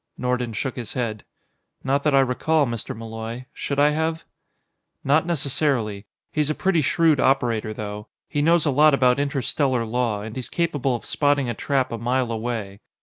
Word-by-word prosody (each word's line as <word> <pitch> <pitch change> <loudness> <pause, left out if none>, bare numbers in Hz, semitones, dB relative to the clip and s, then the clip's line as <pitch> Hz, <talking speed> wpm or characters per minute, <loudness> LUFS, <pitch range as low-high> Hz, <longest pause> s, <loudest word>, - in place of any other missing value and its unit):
Nordon 125 -1 -1
shook 130 +5 -3
his 120 -4 -4
head. 115 -4 -3 0.6
"Not 135 +2 +1
that 150 -2 +3
I 135 - +6
recall, 145 +4 +2
Mr. 115 -3 -5
Malloy. 115 +2 -6
Should 140 0 -3
I 145 +1 +6
have?" 160 +1 -1 0.8
"Not 155 +4 +3
necessarily. 130 -9 -1 0.3
He's 150 -1 +1
a 155 - 0
pretty 185 -4 +2
shrewd 155 +1 +3
operator, 120 -5 +1
though. 105 0 -6 0.2
He 145 - -1
knows 165 +1 +3
a 150 - +2
lot 150 +2 +5
about 125 -1 +3
interstellar 135 -2 0
law, 115 -3 -1
and 110 0 -7
he's 130 -2 -5
capable 145 -7 0
of 120 - -7
spotting 145 -3 +1
a - - -1
trap 130 +2 -1
a 115 - -4
mile 125 +1 0
away. 110 -4 -4
130 Hz, 175 wpm, -23 LUFS, 115-145 Hz, 0.8 s, I